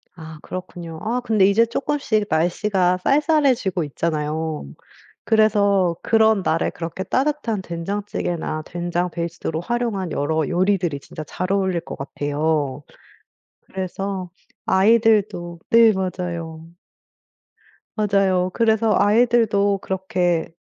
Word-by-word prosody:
아 160 Hz, -2 st, -10 dB
그렇군요. 175 Hz, -3 st, -7 dB
아 245 Hz, +3 st, -1 dB
근데 215 Hz, -5 st, +3 dB
이제 200 Hz, +4 st, +4 dB
쪼끔씩 230 Hz, -3 st, -1 dB
날씨가 180 Hz, +3 st, +1 dB
쌀쌀해지고 275 Hz, -, +2 dB
있잖아요. 155 Hz, -, -2 dB, 0.6 s
그래서 200 Hz, -5 st, +3 dB
그런 220 Hz, -2 st, +3 dB
날에 165 Hz, -2 st, 0 dB
그렇게 170 Hz, +2 st, -6 dB
따뜻한 255 Hz, -3 st, -1 dB
된장찌개나 170 Hz, -3 st, -3 dB
된장 175 Hz, +1 st, -3 dB
베이스로 170 Hz, -1 st, -4 dB
활용한 220 Hz, -5 st, -2 dB
여러 155 Hz, +1 st, 0 dB
요리들이 180 Hz, -5 st, 0 dB
진짜 155 Hz, +2 st, -9 dB
잘 185 Hz, +5 st, -3 dB
어울릴 190 Hz, -3 st, +1 dB
것 165 Hz, -, -8 dB
같아요. 145 Hz, 0 st, -2 dB, 0.8 s
그래서 190 Hz, 0 st, -5 dB, 0.4 s
아이들도 205 Hz, -4 st, +2 dB
네 230 Hz, -1 st, +7 dB
맞아요. 170 Hz, -4 st, -4 dB, 1.3 s
맞아요. 195 Hz, -4 st, +2 dB
그래서 220 Hz, -1 st, +2 dB
아이들도 210 Hz, -2 st, +3 dB
그렇게 180 Hz, -3 st, -1 dB
185 Hz, 270 characters per minute, -21 LUFS, 170-215 Hz, 1.3 s, 네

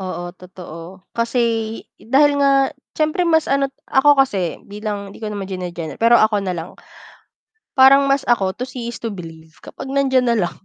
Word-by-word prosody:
Oo, 175 Hz, -2 st, -5 dB
totoo, 180 Hz, 0 st, -12 dB
kasi 230 Hz, +2 st, -2 dB, 0.6 s
dahil 285 Hz, +4 st, +3 dB
nga 275 Hz, -1 st, +3 dB, 0.2 s
siyempre 315 Hz, +3 st, +1 dB
mas 320 Hz, -1 st, +3 dB
ano 275 Hz, 0 st, +1 dB, 0.2 s
ako 290 Hz, +2 st, +4 dB
kasi, 190 Hz, -9 st, -3 dB
bilang 205 Hz, -1 st, -6 dB
'di -, -, -14 dB
ko 215 Hz, -, -4 dB
naman 205 Hz, -2 st, -5 dB
gene-general, 175 Hz, -4 st, -6 dB
pero 230 Hz, +1 st, +6 dB
ako 215 Hz, -2 st, +3 dB
nalang. 180 Hz, -3 st, -4 dB, 1.0 s
Parang 275 Hz, +1 st, +6 dB
mas 275 Hz, 0 st, 0 dB
ako, 195 Hz, -6 st, +2 dB
to 250 Hz, -, -3 dB
see 240 Hz, -2 st, -6 dB
is -, -, -9 dB
to 230 Hz, -, -4 dB
believe, 165 Hz, -5 st, -9 dB
kapag -, -, -9 dB
nandiyan 265 Hz, -2 st, +1 dB
nalang. 220 Hz, -7 st, +1 dB
220 Hz, 165 wpm, -19 LUFS, 185-270 Hz, 1.0 s, pero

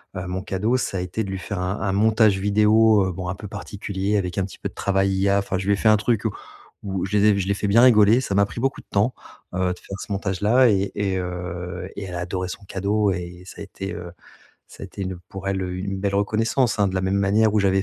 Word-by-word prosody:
heu, 90 Hz, -1 st, -4 dB
mon 90 Hz, +1 st, -3 dB
cadeau 105 Hz, +6 st, 0 dB
ça 110 Hz, -6 st, -2 dB
a -, -, -1 dB
été 90 Hz, +5 st, -3 dB
de 100 Hz, -, -6 dB
lui 95 Hz, 0 st, -4 dB
faire 100 Hz, +1 st, -5 dB
un 90 Hz, +3 st, -2 dB
un 95 Hz, -, 0 dB
montage 110 Hz, -1 st, +4 dB
vidéo, 105 Hz, +1 st, +4 dB
heu, 95 Hz, -, -2 dB
bon 90 Hz, +1 st, -5 dB
un 90 Hz, -, -3 dB
peu 105 Hz, -, -8 dB
particulier 100 Hz, 0 st, -3 dB
avec 90 Hz, -1 st, -2 dB
un 95 Hz, -, +1 dB
petit 95 Hz, -, -11 dB
peu -, -, -4 dB
de -, -, -19 dB
travail 95 Hz, 0 st, +1 dB
IA, 100 Hz, +1 st, +2 dB
enfin 100 Hz, -1 st, -2 dB
je 95 Hz, -, -4 dB
lui 100 Hz, -, +3 dB
ai -, -, +3 dB
fait 110 Hz, +2 st, +2 dB
un 110 Hz, -, +6 dB
truc 110 Hz, +1 st, 0 dB
où 110 Hz, -, +1 dB, 0.5 s
où 95 Hz, -3 st, -3 dB
je 105 Hz, +2 st, 0 dB
les 100 Hz, -, +3 dB
ai 105 Hz, -2 st, +5 dB
je 95 Hz, -, -2 dB
l'ai 100 Hz, -, +2 dB
fais 100 Hz, -, -2 dB
bien 110 Hz, +4 st, +5 dB
rigoler. 115 Hz, -1 st, +6 dB
Ça 100 Hz, -, -2 dB
m'a 100 Hz, 0 st, +4 dB
pris 100 Hz, -, -8 dB
beaucoup 135 Hz, 0 st, -1 dB
de -, -, -33 dB
temps, 105 Hz, +6 st, +1 dB, 0.4 s
heu, 95 Hz, -1 st, +1 dB
de 90 Hz, -, -13 dB
faire 100 Hz, 0 st, -8 dB
ce -, -, -8 dB
montage 95 Hz, -2 st, -2 dB
là 120 Hz, +4 st, +5 dB
et 100 Hz, -2 st, +1 dB
et 95 Hz, -2 st, -1 dB
heu 90 Hz, 0 st, -5 dB
et -, -, -5 dB
elle 90 Hz, -2 st, -6 dB
a -, -, -3 dB
adoré 90 Hz, +1 st, -3 dB
son 90 Hz, -, -8 dB
cadeau 100 Hz, +2 st, 0 dB
et 90 Hz, 0 st, -6 dB
ça 100 Hz, -, -11 dB
a -, -, -4 dB
été, 100 Hz, 0 st, -6 dB
heu, 85 Hz, 0 st, -7 dB, 0.6 s
ça -, -, -14 dB
a -, -, -3 dB
été 100 Hz, +2 st, -7 dB
une 95 Hz, -2 st, -4 dB
pour 95 Hz, 0 st, -8 dB
elle 95 Hz, -1 st, -1 dB
une 95 Hz, +2 st, -4 dB
belle 100 Hz, 0 st, -1 dB
reconnaissance 110 Hz, +4 st, +1 dB
hein. 100 Hz, -1 st, +3 dB
De 95 Hz, -, -5 dB
la 95 Hz, -, +1 dB
même 95 Hz, +1 st, 0 dB
manière 105 Hz, +2 st, +3 dB
où 110 Hz, -, +2 dB
j'avais 95 Hz, -1 st, +2 dB
100 Hz, 285 wpm, -23 LUFS, 95-105 Hz, 0.6 s, un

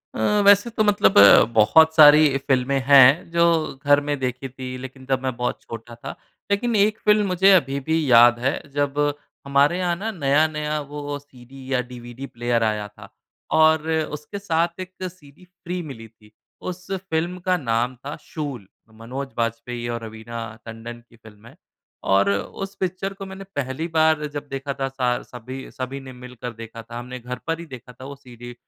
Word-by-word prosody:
अ, 205 Hz, -, +2 dB
वैसे 205 Hz, +3 st, +6 dB
तो 225 Hz, -1 st, 0 dB
मतलब 205 Hz, -1 st, +3 dB
अ, 100 Hz, 0 st, +9 dB
बहुत 160 Hz, +9 st, +5 dB
सारी 150 Hz, -2 st, +7 dB
फ़िल्मे 135 Hz, 0 st, 0 dB
हैं 140 Hz, +3 st, +7 dB
जो 170 Hz, 0 st, +3 dB, 0.4 s
घर 145 Hz, 0 st, +5 dB
में 145 Hz, -, 0 dB
देखी 130 Hz, +1 st, -3 dB
थी, 130 Hz, 0 st, -7 dB
लेकिन 130 Hz, +1 st, -10 dB
तब 130 Hz, 0 st, -1 dB
मैं 130 Hz, -2 st, -2 dB
बहुत 125 Hz, +1 st, -2 dB
छोटा 115 Hz, +1 st, -9 dB
था। 135 Hz, +4 st, -8 dB, 0.4 s
लेकिन 230 Hz, +3 st, +1 dB
एक 210 Hz, +1 st, +3 dB
फ़िल्म 210 Hz, 0 st, +4 dB
मुझे 190 Hz, +1 st, +4 dB
अभी 140 Hz, -6 st, +2 dB
भी 160 Hz, 0 st, +2 dB
याद 120 Hz, 0 st, +7 dB
है, 135 Hz, +4 st, -1 dB
जब 145 Hz, 0 st, -1 dB, 0.5 s
हमारे 140 Hz, +5 st, +3 dB
यहाँ 175 Hz, -1 st, 0 dB
ना 215 Hz, +6 st, -4 dB
नया-नया 150 Hz, -2 st, 0 dB
वो 145 Hz, -1 st, -5 dB
सीडी 135 Hz, -1 st, -14 dB
या 125 Hz, -, +2 dB
डीवीडी 120 Hz, +2 st, -9 dB
प्लेयर 120 Hz, -1 st, -1 dB
आया 105 Hz, -1 st, -1 dB
था, 105 Hz, -, -15 dB, 0.4 s
और 160 Hz, 0 st, +4 dB
उसके 155 Hz, +4 st, -3 dB
साथ 170 Hz, -2 st, -1 dB
एक 185 Hz, 0 st, -7 dB
सीडी 175 Hz, -2 st, -10 dB
फ़्री 180 Hz, 0 st, -7 dB
मिली 115 Hz, -4 st, -9 dB
थी। 105 Hz, -1 st, -23 dB, 0.3 s
उस 185 Hz, +1 st, -7 dB
फ़िल्म 180 Hz, -2 st, -2 dB
का 185 Hz, -1 st, +3 dB
नाम 120 Hz, -3 st, -1 dB
था 145 Hz, -, -5 dB
शूल, 140 Hz, -, -6 dB, 0.2 s
मनोज 125 Hz, +5 st, -7 dB
बाजपेयी 115 Hz, +1 st, -3 dB
और 115 Hz, -1 st, -4 dB
रवीना 115 Hz, +1 st, -7 dB, 0.2 s
टंडन 115 Hz, +1 st, -9 dB
की -, -, -20 dB
फ़िल्म 110 Hz, -1 st, -17 dB
है। -, -, -16 dB, 0.5 s
और 100 Hz, +1 st, +3 dB
उस 195 Hz, -, -4 dB
पिक्चर 190 Hz, +1 st, -3 dB
को 195 Hz, 0 st, -9 dB
मैंने 190 Hz, 0 st, -9 dB
पहली 140 Hz, +3 st, -3 dB
बार 160 Hz, -2 st, +2 dB
जब 145 Hz, 0 st, -7 dB
देखा 135 Hz, +1 st, -4 dB
था, 135 Hz, 0 st, -3 dB
सा 125 Hz, -2 st, -1 dB
सभी, 130 Hz, +2 st, -9 dB
सभी 130 Hz, +1 st, -5 dB
ने 130 Hz, -1 st, -11 dB
मिलकर 125 Hz, -1 st, -9 dB
देखा 115 Hz, 0 st, -9 dB
था। 120 Hz, +2 st, -8 dB
हमने 125 Hz, +1 st, -8 dB
घर 125 Hz, +1 st, -6 dB
पर 165 Hz, 0 st, -1 dB
ही 170 Hz, -, -8 dB
देखा 130 Hz, -4 st, -11 dB
था 130 Hz, +2 st, -12 dB
वो 140 Hz, +1 st, -8 dB
सीडी 120 Hz, -3 st, -12 dB
135 Hz, 180 wpm, -22 LUFS, 120-160 Hz, 0.5 s, अ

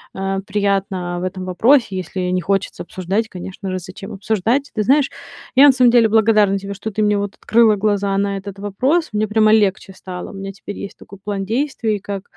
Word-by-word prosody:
э, 195 Hz, 0 st, -2 dB
приятно 195 Hz, -3 st, -1 dB
в -, -, -5 dB
этом 185 Hz, 0 st, -5 dB
вопросе. 225 Hz, +4 st, +3 dB
Если 185 Hz, 0 st, -4 dB
не 185 Hz, 0 st, 0 dB
хочется 195 Hz, +2 st, -1 dB
обсуждать, 190 Hz, +5 st, -2 dB
конечно 190 Hz, +1 st, -7 dB
же, 185 Hz, -, -2 dB
зачем 190 Hz, +4 st, -9 dB
обсуждать. 220 Hz, +7 st, -1 dB
Ты 215 Hz, -, -1 dB
знаешь, 275 Hz, +5 st, +3 dB, 0.5 s
я 275 Hz, +3 st, +8 dB
на -, -, +8 dB
самом 250 Hz, -2 st, +4 dB
деле 230 Hz, -2 st, +5 dB
благодарна 215 Hz, -2 st, +4 dB
тебе, 200 Hz, +1 st, -6 dB
что 200 Hz, +3 st, -5 dB
ты 215 Hz, 0 st, -1 dB
мне 210 Hz, 0 st, +2 dB
вот 200 Hz, 0 st, -4 dB
открыла 225 Hz, -2 st, +3 dB
глаза 200 Hz, -1 st, 0 dB
на 200 Hz, 0 st, 0 dB
этот 195 Hz, 0 st, -8 dB
вопрос. 260 Hz, -, 0 dB
Мне 215 Hz, +1 st, 0 dB
прямо 215 Hz, 0 st, +3 dB
легче 200 Hz, -2 st, +1 dB
стало. 185 Hz, -1 st, -8 dB
У -, -, -13 dB
меня 195 Hz, 0 st, -6 dB
теперь 200 Hz, +1 st, -9 dB
есть 200 Hz, -, -8 dB
такой 200 Hz, -, -14 dB
план 200 Hz, -1 st, -3 dB
действий, 230 Hz, -2 st, -1 dB
как 195 Hz, -1 st, -6 dB
200 Hz, 205 wpm, -19 LUFS, 195-220 Hz, 0.5 s, я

